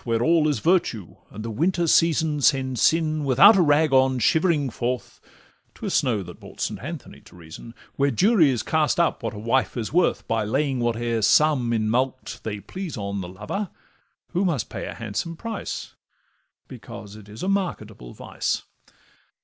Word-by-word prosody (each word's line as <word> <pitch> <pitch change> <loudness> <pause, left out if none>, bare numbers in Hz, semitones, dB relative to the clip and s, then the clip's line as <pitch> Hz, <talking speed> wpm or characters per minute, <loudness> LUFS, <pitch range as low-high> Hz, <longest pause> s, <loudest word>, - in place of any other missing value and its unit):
Where 115 -1 0
all 160 0 +3
is 150 -3 +1
virtue, 140 - 0
and 110 +2 -8
the 115 - -4
winter 170 - 0
season 160 -2 +2
Sends 130 -3 +2
sin, 155 -2 +2
without 145 - +7
a 190 - +4
rag 150 -2 +3
on, 130 0 +4
shivering 150 - +2
forth 125 +2 -4 0.5
('Twas - - -4
snow 110 -6 +1
that - - -11
brought - - -14
St. - - -3
Anthony - - -8
to - - -18
reason); 85 +8 -12 0.2
Where 140 0 +2
juries 145 - +3
cast 155 +3 +1
up 170 - +1
what - - -4
a - - -8
wife 115 +5 0
is 115 +2 -4
worth, 175 +1 +1
By 115 -1 0
laying 135 +4 -1
whate'er 120 -1 -1
sum 135 0 +3
in 110 -2 0
mulct 130 +3 -2
they 105 -2 -4
please 175 - -7
on 100 -1 -4
The 90 - -7
lover, 105 - -5 0.6
who 180 +2 -1
must 165 - -1
pay - - -6
a - - -7
handsome 115 +9 -4
price, 225 0 -6 0.7
Because 100 0 -10
it 105 -1 -13
is 110 +3 -9
a - - -2
marketable 110 - -3
vice. - - -3
130 Hz, 175 wpm, -24 LUFS, 110-160 Hz, 0.7 s, without